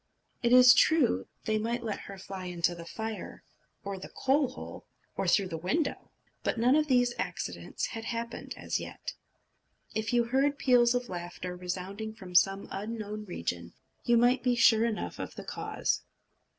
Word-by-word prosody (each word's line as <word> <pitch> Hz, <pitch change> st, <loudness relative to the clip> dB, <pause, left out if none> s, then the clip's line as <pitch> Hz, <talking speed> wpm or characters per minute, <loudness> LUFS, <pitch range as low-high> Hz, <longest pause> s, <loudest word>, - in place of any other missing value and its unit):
It 235 Hz, -, +2 dB
is 250 Hz, 0 st, +9 dB
true, 265 Hz, -, +3 dB, 0.2 s
they 215 Hz, 0 st, +1 dB
might 235 Hz, +2 st, -2 dB
let 215 Hz, -3 st, -3 dB
her 195 Hz, -, -9 dB
fly 190 Hz, -1 st, -7 dB
into 175 Hz, -1 st, 0 dB
the 170 Hz, -1 st, -9 dB
fire 220 Hz, +2 st, -6 dB, 0.4 s
or 200 Hz, -2 st, -4 dB
the -, -, -9 dB
coal 275 Hz, +1 st, +2 dB
hole, 255 Hz, -, -9 dB, 0.3 s
or -, -, -1 dB
through 195 Hz, -3 st, +3 dB
the 165 Hz, -2 st, -4 dB
window; 280 Hz, -, -1 dB, 0.3 s
but -, -, -1 dB
none 245 Hz, +4 st, +4 dB
of 305 Hz, 0 st, +3 dB
these 245 Hz, -3 st, +3 dB
accidents -, -, -3 dB
had 225 Hz, -1 st, -6 dB
happened 235 Hz, 0 st, -4 dB
as -, -, -2 dB
yet. -, -, -7 dB, 0.8 s
If 220 Hz, -1 st, -1 dB
you 240 Hz, -1 st, +4 dB
heard 270 Hz, +4 st, +1 dB
peals 245 Hz, -3 st, +4 dB
of 245 Hz, 0 st, -1 dB
laughter 180 Hz, 0 st, -6 dB
resounding 190 Hz, +4 st, -5 dB
from 190 Hz, -5 st, -10 dB
some 195 Hz, +2 st, +4 dB
unknown 210 Hz, +1 st, -5 dB
region, 85 Hz, -, -4 dB, 0.3 s
you 240 Hz, 0 st, +4 dB
might 245 Hz, +2 st, +4 dB
be 250 Hz, -1 st, +2 dB
sure 230 Hz, -1 st, +5 dB
enough 225 Hz, -2 st, -3 dB
of -, -, -6 dB
the -, -, -8 dB
cause. -, -, -2 dB
220 Hz, 170 wpm, -30 LUFS, 190-245 Hz, 0.8 s, is